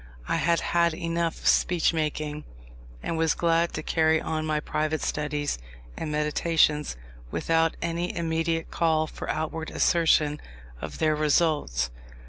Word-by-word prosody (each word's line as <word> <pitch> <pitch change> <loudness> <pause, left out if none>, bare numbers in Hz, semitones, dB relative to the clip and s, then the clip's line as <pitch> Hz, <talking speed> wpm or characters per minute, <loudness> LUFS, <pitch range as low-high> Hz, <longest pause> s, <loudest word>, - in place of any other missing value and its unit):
I - - +1
had 170 0 +2
had 170 -1 +2
enough 170 -1 -2
of - - -2
speech 175 -2 +3
making, 150 -1 -2 0.6
and 165 - -2
was 160 -1 +2
glad 170 0 +2
to 155 - -4
carry 160 0 +3
on 155 0 -2
my 155 -1 +1
private 155 +1 -2
studies 150 - -2 0.4
and 155 - -4
meditations 150 - +1 0.3
without 165 - +1
any 170 +1 -2
immediate 165 0 -1
call 160 -2 +2
for - - -8
outward 160 +1 -2
assertion 155 -3 +2 0.4
of - - -6
their 155 -1 +2
results. 150 - +1
160 Hz, 135 wpm, -26 LUFS, 150-165 Hz, 0.6 s, speech